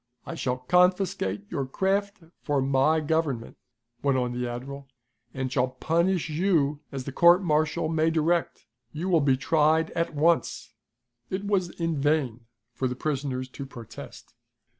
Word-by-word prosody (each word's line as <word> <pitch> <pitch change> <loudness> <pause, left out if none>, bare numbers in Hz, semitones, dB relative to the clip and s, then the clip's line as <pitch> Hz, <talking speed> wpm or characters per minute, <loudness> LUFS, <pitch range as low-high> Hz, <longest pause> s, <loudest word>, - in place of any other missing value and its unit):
"I - - -6
shall 125 -6 -2
confiscate 180 - +1
your 135 -2 -2
craft 200 +6 -1 0.2
for 145 -2 0
my 135 +4 +2
government," 150 -6 -1 0.4
went 140 -2 +2
on 125 -1 0
the 125 0 -3
admiral, 135 +3 -7 0.4
"and 130 0 -3
shall 125 -1 +2
punish 170 +7 0
you 155 -3 +1
as 135 -2 -5
the 140 - -6
court 175 +6 +5
martial 155 -1 +1
may 160 0 +2
direct. 165 -4 0 0.3
You 170 +5 -3
will 170 -4 +4
be 135 -2 +3
tried 155 +3 +2
at 165 -2 -2
once." 150 -6 +1 0.6
It 190 +2 -3
was 195 -4 +1
in 165 -4 -1
vain 135 -6 0 0.3
for 130 - -1
the 125 - -3
prisoners 135 -2 -2
to 140 - -8
protest. 120 -4 -11
150 Hz, 150 wpm, -26 LUFS, 130-170 Hz, 0.6 s, court